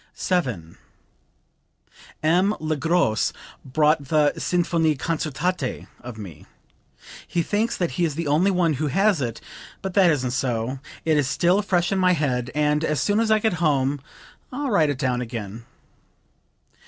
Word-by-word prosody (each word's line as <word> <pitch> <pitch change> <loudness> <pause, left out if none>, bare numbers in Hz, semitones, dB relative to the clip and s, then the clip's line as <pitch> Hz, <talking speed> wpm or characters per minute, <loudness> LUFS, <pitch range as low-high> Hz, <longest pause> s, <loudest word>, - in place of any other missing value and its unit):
7. 120 - -2 1.4
"M. 180 +6 +3
Le 155 0 -1
Gros 150 - +1 0.3
bought 150 +2 +2
the 150 0 +2
'Sinfonie 165 -3 +1
concertante' 155 +1 -2
of 120 -2 -9
me. 95 -8 -10 0.8
He 170 - 0
thinks 215 +6 -1
that 175 -2 -1
he 180 - -1
is 155 -4 0
the 165 +1 -3
only 155 +7 +3
one 180 -4 +2
who 155 - +1
has 195 +3 +2
it; 115 -3 -3 0.4
but 190 -1 -3
that 190 -3 +5
isn't 130 -6 0
so. 125 0 -2 0.3
It 160 -2 +3
is 145 -3 +1
still 180 +8 +2
fresh 180 -4 0
in 195 - +1
my 185 -1 +4
head, 125 -6 -1
and 150 +1 +1
as 155 -2 0
soon 205 +1 +1
as 225 -1 +1
I 220 - +5
get 220 -2 +1
home 140 -3 +1 0.5
I'll 275 0 -3
write 160 -7 +3
it 145 - -2
down 125 -1 0
again." 115 -2 -6
155 Hz, 155 wpm, -23 LUFS, 130-180 Hz, 1.4 s, that